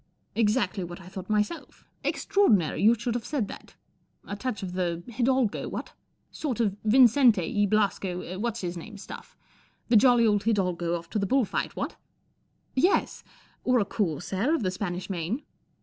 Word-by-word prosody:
" - - -44
Exactly 210 -3 +1
what 175 +1 -7
I 180 - -13
thought 190 +1 -8
myself. 210 +10 -2 0.2
Extra¬ - - -3
ordinary 205 - +4
you 225 +3 +6
should 235 +1 -2
have 240 -1 -3
said 265 -7 -2
that. - - -11 0.5
4 - - -6
touch 210 -3 -3
of 180 -1 -5
the 175 -2 -2
hidalgo, 255 -2 +1
what? - - -6 0.4
Sort 265 -8 -3
of 205 -4 +1
Vincente 235 -2 +5
y 205 -1 +2
Blasco 190 -3 -1
What's 230 +1 -2
his 175 -1 -3
name 200 +5 -9
stuff. 200 - -10 0.5
The 240 - +4
jolly 240 +1 +6
old 205 -2 +2
hidalgo 180 -6 +1
off 170 0 -11
to 215 - 0
the 200 - 0
bull 265 +2 +3
fight, - - -3
what? - - -4 0.3
" - - -44
* - - -42
Yes. - - -1 0.4
Or 255 0 +3
a 205 - +1
corsair 195 - -1
of 265 - -2
the 185 - 0
Spanish 185 -1 -4
Main." 190 - -3
205 Hz, 180 wpm, -27 LUFS, 185-235 Hz, 0.5 s, you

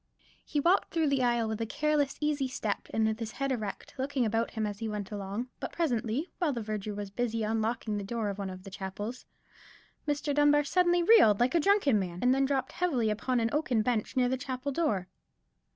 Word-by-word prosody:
He 295 - -2
walked 345 +7 +3
through 320 -3 +1
the 275 -2 +2
aisle 240 -2 +2
with 220 0 -3
a 225 - -1
careless 295 +1 +1
easy 295 -3 0
step, 220 -5 -3
and 220 0 +1
with 220 +1 0
his 225 -2 -5
head 275 +1 -2
erect, 215 -6 -4
looking 265 -2 0
about 225 +1 0
him 220 -1 -2
as 205 -1 -4
he 225 - -3
went 210 -2 -4
along: 205 +4 -4
but - - -4
presently, 260 -1 -1
while 340 -5 +2
the 245 - -3
verger 210 -1 -4
was 205 -1 -5
busy 230 0 -1
unlocking 220 0 -1
the - - -4
door 220 +1 -2
of 200 0 -5
one 195 -1 -3
of 185 0 -9
the 195 - -10
chapels, 205 +5 -6 0.8
Mr. 290 0 0
Dunbar 295 0 +4
suddenly 350 +3 +3
reeled 335 - +6
like 245 +2 +2
a 340 - +4
drunken 330 - +3
man, 175 -3 -4
and 250 +1 +5
then 270 +1 +2
dropped 270 -1 -1
heavily 260 -12 +1
upon 245 +4 0
an 230 0 0
oaken 260 -7 +1
bench 235 0 -1
near 250 -1 +4
the 260 +1 0
chapel 260 +1 -4
door. 220 - 0
240 Hz, 215 wpm, -30 LUFS, 215-285 Hz, 0.8 s, reeled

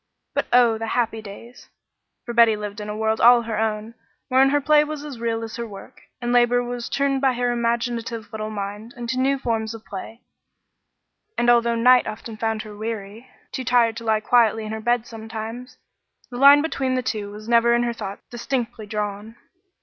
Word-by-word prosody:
But - - -1
oh, 240 -2 +4
the 225 - -4
happy 225 -2 0
days! 220 +4 -12 0.6
For 235 - -5
Betty 230 -2 +5
lived 210 0 -6
in 210 - -6
a 210 - -4
world 220 0 0
all 240 0 +7
her 225 -1 -3
own, 220 0 -2 0.4
wherein 265 +1 +5
her 290 +1 +2
play 300 +1 +4
was 300 -1 -6
as 275 -6 -8
real 230 -1 -2
as 225 +1 -7
her 235 0 -4
work, 210 +5 -12 0.2
and 240 0 -2
labor 245 0 +4
was 245 -1 -5
turned 275 -1 0
by 265 -2 +3
her 245 0 0
imaginative 235 -1 -2
little 215 0 -4
mind 210 +2 -6
into 240 +1 -3
new 275 +1 +2
forms 225 -3 -2
of 225 - -13
play, 220 +4 -8 1.2
and 240 0 +4
although 235 -1 +3
night 250 +2 +5
often 220 +1 -7
found 220 0 -2
her 210 -1 -10
weary 220 +2 -6 0.2
too 260 - -4
tired 235 -2 +3
to 230 - -7
lie 220 -1 +1
quietly 225 -1 +3
in 215 - -5
her 220 0 -5
bed 240 0 +1
sometimes 225 +3 -8 0.5
the 245 - -6
line 280 +2 +7
between 265 -5 -1
the 255 - -1
two 215 -5 -3
was 210 +1 -10
never 235 0 +4
in 240 - +1
her 240 -1 -1
thoughts 200 -3 -7
distinctly 240 -3 -4
drawn. 210 +1 -4
230 Hz, 195 wpm, -23 LUFS, 220-245 Hz, 1.2 s, all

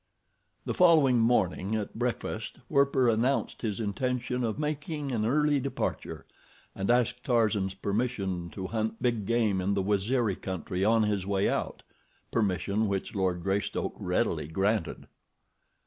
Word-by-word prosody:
The - - -1
following 155 -9 +5
morning 110 -3 +2
at 105 -2 -3
breakfast, 115 -2 -3
Werper 140 -3 +3
announced 120 +4 +1
his 110 -3 -2
intention 125 +4 -1
of 110 -2 -1
making 150 -1 -3
an 110 -3 0
early 150 +2 +3
departure, 135 0 -3 0.5
and 95 +2 -3
asked 125 0 +2
Tarzan's 105 -6 +1
permission 100 -4 -2
to 95 +2 -6
hunt 110 +2 -2
big 115 -5 0
game 110 -5 +2
in 100 +2 0
the 100 - 0
Waziri 105 +2 +1
country 95 0 -3
on 110 +2 +4
his 100 -3 -1
way 100 -1 +1
out—permission 105 +1 -2
which 100 -1 -2
Lord 95 -3 -1
Greystoke 100 +1 -1
readily - - 0
granted. 95 +6 -1
110 Hz, 130 wpm, -29 LUFS, 100-125 Hz, 0.5 s, following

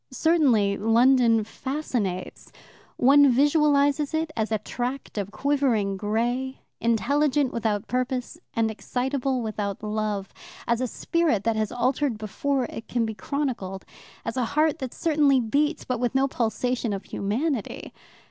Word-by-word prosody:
Certainly 260 -9 +3
London 230 +1 +4
fascinates. 230 -7 -4 0.5
One 280 +2 +6
visualizes 290 +2 +3
it 315 0 -1
as 220 -1 -1
a 220 - +2
tract 245 +5 -5
of 200 -1 -3
quivering 230 -4 +1
grey, 240 +6 -2 0.2
intelligent 275 +4 +1
without 215 -3 -1
purpose, 255 +4 -2 0.2
and 225 -1 +1
excitable 255 +3 -2
without 210 -2 -4
love; 210 -2 -2 0.3
as 235 0 +1
a 255 - 0
spirit 315 - 0
that 230 0 +1
has 215 -1 -1
altered 255 0 0
before 255 +5 -1
it 225 - -8
can 240 -2 0
be 220 - -3
chronicled; 215 -5 -3 0.4
as 230 - -3
a 250 - +1
heart 310 -1 +3
that 260 -2 -4
certainly 295 -4 +3
beats, 290 +7 0
but 250 -2 -2
with 245 0 -1
no 270 +1 +3
pulsation 240 -1 -1
of 195 -1 -4
humanity. 235 +5 -3
245 Hz, 140 wpm, -25 LUFS, 220-280 Hz, 0.5 s, One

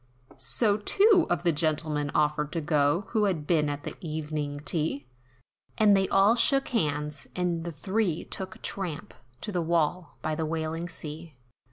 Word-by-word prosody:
So 205 - +2
two 390 - +4
of 175 0 0
the 175 - +3
gentlemen, 150 -1 0
offered 150 0 +1
to 165 - 0
go, 150 +3 +2
Who 215 -3 +2
had 170 -7 -1
been 150 -3 +2
at 145 0 -4
the - - -5
evening 150 -3 -4
tea, 150 -3 -1 0.7
And 210 -2 +6
they 195 -1 +2
all 195 +3 +5
shook 275 +3 +3
hands, 150 - -1
and 175 -2 -1
the 170 - -3
three 190 +2 -1
took 190 -1 -8
tramp, 180 -6 -4 0.3
To 210 - -4
the 180 -3 0
wall, 165 0 0
by 155 - -1
the 160 +1 -2
wailing 165 +2 -3
sea. 160 -1 -7
165 Hz, 165 wpm, -27 LUFS, 150-190 Hz, 0.7 s, And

